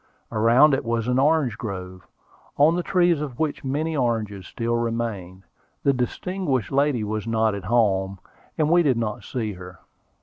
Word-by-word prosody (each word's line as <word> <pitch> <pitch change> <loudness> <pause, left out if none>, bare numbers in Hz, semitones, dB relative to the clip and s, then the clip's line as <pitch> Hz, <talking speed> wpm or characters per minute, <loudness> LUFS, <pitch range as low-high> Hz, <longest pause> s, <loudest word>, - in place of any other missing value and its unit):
Around 115 +7 +5
it 135 - 0
was 115 0 -1
an 125 +1 +2
orange 140 -5 +2
grove, 95 -4 -7 0.5
on 155 +4 +5
the 180 - 0
trees 175 -3 +2
of 135 -5 -5
which 155 -2 -2
many 150 +4 -2
oranges 110 - -1
still 115 0 -2
remained. 115 -6 -3 0.4
The 140 - +3
distinguished 130 - -2
lady 140 -4 +1
was 110 +1 -3
not 110 -1 +1
at 100 -2 -6
home, 100 -3 +1 0.4
and 155 -1 +2
we 175 0 +6
did 135 -7 +2
not 110 -2 -3
see 110 -5 -3
her. 90 0 -11
120 Hz, 165 wpm, -24 LUFS, 105-145 Hz, 0.5 s, we